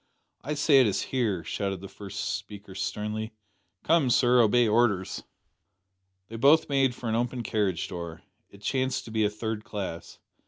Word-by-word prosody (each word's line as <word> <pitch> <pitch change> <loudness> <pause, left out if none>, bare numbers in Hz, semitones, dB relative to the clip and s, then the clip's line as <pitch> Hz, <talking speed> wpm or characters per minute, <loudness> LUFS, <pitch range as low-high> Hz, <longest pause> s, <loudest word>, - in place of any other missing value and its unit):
"I 150 +4 -2
say 145 -2 +5
it 125 - +4
is 100 - 0
here," 110 -10 -1
shouted 95 -1 -3
the 95 - -8
first 100 0 -5
speaker 100 -1 -9
sternly. 105 +3 -3 0.5
"Come, 160 -5 +3
sir, 125 0 +5
obey 120 +2 +4
orders!" 105 -4 +1 1.1
They 115 - -7
both 145 +7 +5
made 135 -3 +2
for 120 - -6
an 110 - 0
open 120 +1 -1
carriage 105 -5 -1
door. 85 -3 -7 0.3
It 100 0 -17
chanced 130 +3 -1
to 115 - -9
be 110 -1 +1
a - - +2
third 110 0 -4
class. 100 -7 -6
110 Hz, 165 wpm, -27 LUFS, 100-125 Hz, 1.1 s, say